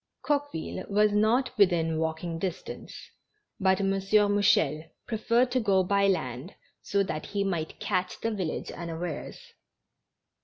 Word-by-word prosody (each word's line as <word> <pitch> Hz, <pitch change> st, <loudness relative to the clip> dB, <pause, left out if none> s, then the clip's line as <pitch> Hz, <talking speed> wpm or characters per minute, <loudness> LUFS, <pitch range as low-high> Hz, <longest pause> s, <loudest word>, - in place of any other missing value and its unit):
Coqueville 285 Hz, -, -2 dB
was 210 Hz, +1 st, +3 dB
not 220 Hz, +6 st, +2 dB
within 165 Hz, -5 st, +3 dB
walking 165 Hz, +1 st, -2 dB
distance, 185 Hz, 0 st, -6 dB, 0.5 s
but 190 Hz, -1 st, +3 dB
M. 195 Hz, -1 st, +1 dB
Mouchel 195 Hz, -6 st, +3 dB, 0.2 s
preferred 235 Hz, +2 st, +1 dB
to 255 Hz, -, +2 dB
go 195 Hz, -4 st, +3 dB
by 200 Hz, +1 st, +2 dB
land 130 Hz, -3 st, -2 dB, 0.3 s
so 200 Hz, 0 st, +1 dB
that 155 Hz, -5 st, -4 dB
he 200 Hz, -1 st, -1 dB
might 170 Hz, -5 st, -3 dB
catch 185 Hz, -3 st, -1 dB
the 225 Hz, -, -1 dB
village 185 Hz, -7 st, -3 dB
unawares. 170 Hz, -1 st, -5 dB
195 Hz, 125 wpm, -28 LUFS, 165-210 Hz, 0.5 s, was